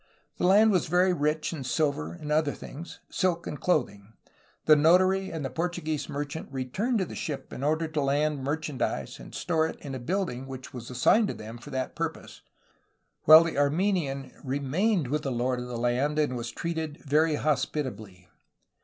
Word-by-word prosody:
The - - +2
land 210 +4 +6
was 185 -5 +2
very 180 +3 +3
rich 150 0 0
in 145 -5 -5
silver 130 - 0
and 150 - -7
other 150 -1 +2
things, 165 +5 -9
silk 175 -2 0
and 150 - -6
clothing. 105 - 0 0.5
The 155 - +8
notary 185 +5 +4
and 160 -4 -4
the 135 - -4
Portuguese 165 -3 -2
merchant 145 +2 -5
returned 140 - -1
to 190 - 0
the - - -9
ship 145 -3 -5
in 130 - -6
order 155 +2 +1
to 155 -1 -2
land 145 0 +1
mer 145 +3 0
chandise 130 - -3
and - - -11
store 160 -2 +1
it - - -8
in 140 - -7
a 130 - -4
building 135 -3 -2
which 130 -1 -8
was 120 -2 -7
assigned 200 - +3
to - - -4
them 110 +2 -9
for 145 - -11
that 130 -2 -3
purpose, - - -5 0.8
while 155 +2 +10
the 165 -4 -2
Armenian 145 -3 0
remained 145 - 0
with 150 +4 -1
the 135 - -3
lord 125 +1 0
of 125 - -5
the 125 -1 -5
land 125 +5 0
and 150 -4 +1
was 120 -1 -4
treated 160 -3 -4
very 155 +2 +3
hospitably. 125 -11 -2
150 Hz, 185 wpm, -28 LUFS, 130-165 Hz, 0.8 s, while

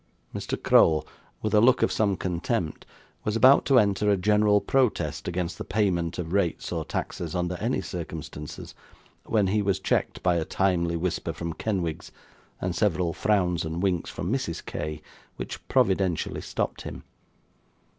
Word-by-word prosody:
Mr. - - -3
Crowl, 80 -1 +5 0.4
with 110 -1 -1
a 105 - +6
look 125 +2 +5
of - - +2
some 100 -3 +1
contempt, 90 0 -2 0.4
was 105 - -1
about 130 +5 +6
to 135 - +4
enter 105 -2 +3
a 100 - +4
general 105 +2 +4
protest 100 - 0
against 90 0 -3
the - - -3
payment 90 -5 0
of 85 -1 -4
rates 100 -4 0
or - - -2
taxes, 85 -2 -4
under 90 0 -1
any 115 0 -1
circumstances, 80 -4 -7 0.5
when 105 -3 +2
he 105 +3 +1
was 100 -3 +1
checked - - -1
by 90 -1 +3
a 80 - 0
timely 85 -1 +1
whisper 85 -1 -2
from 85 +1 -4
Kenwigs, 90 -5 -3 0.5
and 90 -1 -2
several 90 -5 +1
frowns 90 -4 +1
and 80 +3 -3
winks 90 -4 0
from - - -3
Mrs. - - -3
K., 75 0 -5 0.3
which - - -7
providentially 95 -3 +1
stopped - - -3
him. - - -8
90 Hz, 155 wpm, -26 LUFS, 85-105 Hz, 0.5 s, a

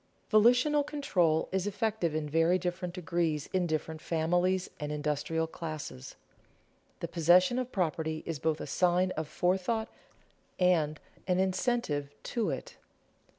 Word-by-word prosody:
Volitional 245 +7 +5
control 180 - +1
is 190 +1 0
effective 205 -6 -1
in 155 -1 -1
very 165 +4 +3
different 180 0 -3
degrees 170 -4 -1
in 185 -2 +1
different 155 0 -3
families 175 +3 +1
and 150 -1 -4
industrial 150 +2 -1
classes. 155 - -7 0.9
The - - -2
possession 180 +8 +4
of 255 0 -4
property 160 -3 -1
is 165 -4 -4
both 160 0 0
a - - -4
sign 180 +4 +2
of 155 -3 -3
forethought 190 +7 0 0.7
and 160 -5 +2 0.3
an 180 -1 +2
incentive 190 - 0 0.2
to 230 -2 +1
it. - - -5
175 Hz, 130 wpm, -30 LUFS, 155-190 Hz, 0.9 s, Volitional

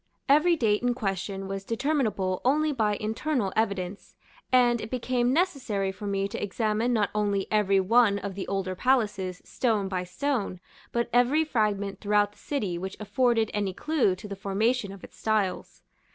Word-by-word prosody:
Every 305 +5 +5
date 215 -8 +1
in 245 0 +1
question 195 -3 -3
was 195 0 -4
determinable 225 -6 0
only 300 +4 +2
by 215 -6 +1
internal 220 0 -1
evidence, 200 -3 -2 0.4
and 240 -2 +4
it 220 - -6
became 250 0 0
necessary 255 - 0
for 205 +2 -7
me 195 0 0
to - - -5
examine 215 +3 0
not 215 -4 +1
only 205 -2 0
every 200 -2 +3
one 205 +1 +4
of 200 -1 -5
the 190 0 -5
older 195 -1 -2
palaces, 205 -5 0
stone 220 -6 0
by 185 -1 -2
stone, 200 0 -2 0.3
but 235 0 0
every 250 +6 +4
fragment 205 -8 -1
throughout 205 -1 +2
the - - -24
city 200 -12 -2
which 190 +2 -6
afforded 225 +1 +1
any 205 -2 -1
clue 300 -12 +1
to 185 - -10
the 200 - -5
formation 205 +3 0
of 195 -1 -11
its - - -13
styles. 215 -4 -1
210 Hz, 165 wpm, -27 LUFS, 195-245 Hz, 0.4 s, Every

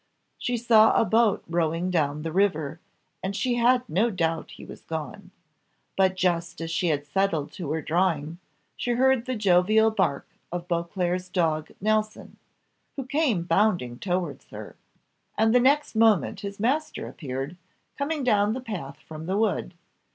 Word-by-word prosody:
She 245 -1 -1
saw 225 -2 +5
a - - +3
boat 220 -2 +2
rowing 170 +1 0
down 150 -3 0
the 165 - -3
river, 160 -5 0 0.4
and 195 +1 -3
she 250 +3 0
had 250 +1 +3
no 215 +8 +2
doubt 165 -5 -1
he - - -11
was - - -11
gone. 160 +4 -6 0.7
But 190 -1 +3
just 175 -2 -1
as 165 0 -4
she 175 +2 0
had 145 -3 0
settled 160 -1 0
to 170 -7 -5
her 160 -1 -2
drawing, 165 -2 0 0.4
she 245 - -1
heard 260 0 +2
the 255 - -1
joyful 215 +2 +4
bark 140 -10 0 0.2
of 175 0 -4
Beauclerc's 180 +1 -2
dog 160 -4 0
Nelson, 215 +1 -1 0.6
who 270 -3 -5
came 260 - +1
bounding 175 - +1
towards 175 -6 -3
her, - - -9 0.6
and 220 +1 +3
the 250 - +6
next 280 +4 +2
moment 220 -3 +3
his 200 0 -7
master 275 +8 -1
appeared, 135 +2 -5 0.4
coming 290 0 -2
down 210 -3 +3
the 255 - -3
path 180 - -6
from 160 +1 -9
the 190 +2 0
wood. 205 -4 0
185 Hz, 160 wpm, -26 LUFS, 165-220 Hz, 0.7 s, the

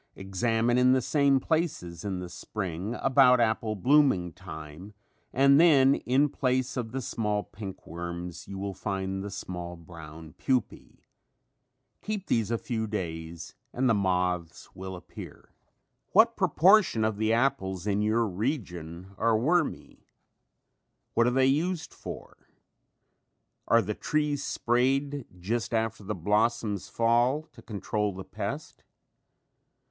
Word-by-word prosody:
Examine 115 +5 0
in 125 0 +5
the 130 - +3
same 140 0 +3
places 155 - -2
in 100 -3 -3
the 90 0 -5
spring 95 +3 -5
about 130 -2 +6
apple 110 -1 +1
blooming 125 - +3
time 85 +3 -10 0.4
and 140 +2 +5
then 140 -5 +6
in 135 +2 +2
place 130 -2 -1
of 120 -4 -3
the 135 +1 -3
small 105 -2 -1
pink 100 -3 -9
worms 85 +1 -6
you 100 - -7
will 100 0 -4
find 95 -1 -3
the 100 - -5
small 90 -2 -6
brown 80 -2 -11
pupae. 125 -5 -2 1.0
Keep 210 -2 -4
these 115 -3 +1
a 115 - +1
few 110 -1 -3
days 85 -4 -5 0.2
and 130 +1 0
the 115 - +4
moths 90 -4 -1
will 95 0 -7
appear. 90 - -11 0.6
What 225 +3 +6
proportion 185 - +4
of 110 -1 -2
apples 110 -5 +1
in 105 0 +1
your 110 +2 +2
region 95 - -4
are 115 -1 +3
wormy? 160 +7 -1 1.1
What 115 +1 +3
are - - +5
they 130 +1 +3
used 160 +6 0
for? - - -9 1.3
Are 115 -1 +4
the 105 +3 -2
trees 150 +3 -1
sprayed 135 +3 0
just 110 +4 -2
after 110 -1 -1
the 105 +2 -3
blossoms 105 +2 0
fall 120 +6 +2
to 115 - -15
control 105 -1 -2
the 95 - -6
pest? - - -6
110 Hz, 130 wpm, -28 LUFS, 95-130 Hz, 1.3 s, about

